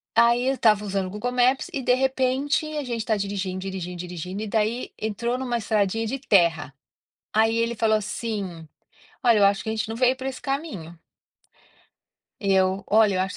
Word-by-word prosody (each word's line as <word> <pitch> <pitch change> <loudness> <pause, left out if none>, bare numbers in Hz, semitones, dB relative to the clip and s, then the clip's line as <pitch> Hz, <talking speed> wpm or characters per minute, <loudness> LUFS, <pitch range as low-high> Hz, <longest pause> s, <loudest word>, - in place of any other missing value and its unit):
Aí 235 +2 +4
eu 270 - +2
estava 215 -4 +3
usando 195 -1 -1
o 185 - -6
Google 210 +5 -3
Maps, 250 +2 +2
e 270 - -3
de 250 - +3
repente, 265 +3 +1
a 295 - -2
gente 240 -2 -3
está 220 0 0
dirigindo, 195 -2 -3
dirigindo, 185 -2 -5
dirigindo, 180 +3 -6
e - - -3
daí 220 +3 -1
entrou 235 +3 -2
em - - -4
uma 245 -2 -1
estradinha 220 0 0
de 270 +5 -3
terra. 170 - +2 0.6
Aí 225 +1 +3
ele 230 +1 0
falou 220 -1 +3
assim: 200 -5 -5 0.6
"Olha, 235 -3 +5
eu 200 - +5
acho 200 0 +2
que - - -5
a - - -1
gente 220 0 -2
não 225 - -4
veio 250 +1 +3
para 260 +1 -4
esse 260 - -6
caminho". 270 - -4 1.4
Eu: 190 -1 +2
"Olha, 215 -2 +4
eu - - +1
acho 190 +1 -1
220 Hz, 195 wpm, -24 LUFS, 195-245 Hz, 1.4 s, Olha